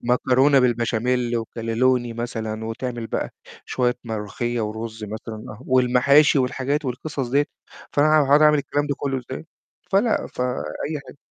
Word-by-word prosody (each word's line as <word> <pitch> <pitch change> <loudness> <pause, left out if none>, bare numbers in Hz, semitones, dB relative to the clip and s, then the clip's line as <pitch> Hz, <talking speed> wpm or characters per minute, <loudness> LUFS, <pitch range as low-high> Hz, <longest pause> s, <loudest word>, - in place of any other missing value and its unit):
مكرونة 130 +3 +3
بالبشاميل 120 0 +1
وكانلوني 115 +2 0
مثلًا، 110 -2 -4
وتعمل 120 +1 -4
بقى - - -3 0.3
شوية 125 -1 0
ملوخية 115 +2 -3
ورُز 110 0 -4
مثلًا، 110 0 -7
والمحاشي 130 +3 +5
والحاجات 135 +3 -1
والقصص 130 +1 -3
ديّة، 140 +3 +2 0.5
فأنا 145 +1 +4
هاقعد 145 +2 +5
أعمل 150 -1 +6
الكلام 145 +1 -1
ده 140 - -1
كلّه 135 -2 -1
إزاي؟ 135 +5 -6 0.5
فلأ، 210 +3 +2
فأي 130 +4 -3
حاجة. - - -12
125 Hz, 125 wpm, -23 LUFS, 115-140 Hz, 0.5 s, أعمل